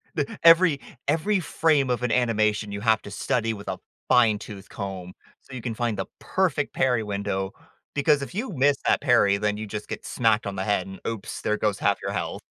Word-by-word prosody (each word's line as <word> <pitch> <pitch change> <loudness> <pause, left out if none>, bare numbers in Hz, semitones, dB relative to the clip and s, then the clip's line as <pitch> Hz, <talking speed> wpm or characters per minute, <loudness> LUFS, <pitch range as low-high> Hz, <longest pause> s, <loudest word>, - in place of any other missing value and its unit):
D 145 - +1 0.2
every 165 -2 +7 0.3
every 165 +8 +2
frame 155 -5 +2
of 125 -1 0
an 125 - 0
animation, 110 -4 +1
you 100 - -4
have 110 -1 +3
to 100 - -9
study 115 +2 -1
with 100 -1 -10
a 95 -1 -3 0.3
fine 115 -4 +4
tooth 100 -2 -10
comb 95 -3 -6 0.3
so 130 - -15
you 125 - -6
can 115 0 -3
find 115 -2 -1
the 95 - -2
perfect 170 -7 0
parry 125 -4 +2
window, 100 -2 -2 0.4
because 145 0 +3
if 140 - -6
you 220 +4 -3
miss 140 0 +3
that - - +3
parry, 100 -7 +4
then 105 0 -1
you 110 0 -5
just 105 +1 -6
get - - -6
smacked 115 -2 +1
on 100 - -4
the 95 - -2
head 95 -2 0
and, 95 -1 -9
oops, 115 -3 -5
there 105 - 0
goes 105 -2 0
half - - +2
your - - -3
health. - - -3
110 Hz, 215 wpm, -25 LUFS, 100-140 Hz, 0.4 s, every